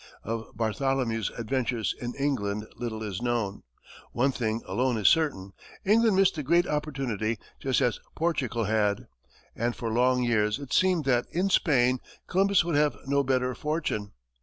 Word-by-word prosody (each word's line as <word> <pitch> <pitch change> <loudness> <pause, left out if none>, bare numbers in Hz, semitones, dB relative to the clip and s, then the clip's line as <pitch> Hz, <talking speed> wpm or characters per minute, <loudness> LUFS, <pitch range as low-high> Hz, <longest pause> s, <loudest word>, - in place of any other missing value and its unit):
Of 115 -1 -5
Bartholomew's 115 -1 0
adventures 120 -3 -1
in 120 0 -4
England 105 -7 -1
little 110 -2 -4
is 105 -1 -4
known. 120 -5 -1 0.5
One 135 +3 +2
thing 115 -3 -2
alone 125 -1 0
is 105 -3 +2
certain 100 -12 +2 0.3
England 220 +1 +4
missed 195 0 +4
the 155 - -4
great 170 +5 +3
opportunity 135 -8 -2 0.2
just 135 0 +1
as 125 -3 +1 0.2
Portugal 140 -8 0
had. 105 -1 +1 0.5
And 120 +1 -1
for 115 -2 -3
long 125 +1 +3
years 105 -3 +2
it 140 -2 -7
seemed 185 -5 +3
that, 125 -2 +2
in 190 +3 0
Spain, 130 -7 +3 0.3
Columbus 195 -1 +3
would 170 - -1
have 145 -5 +2
no 140 +1 +2
better 130 -1 +1
fortune. 135 -7 -3
125 Hz, 155 wpm, -27 LUFS, 110-145 Hz, 0.5 s, England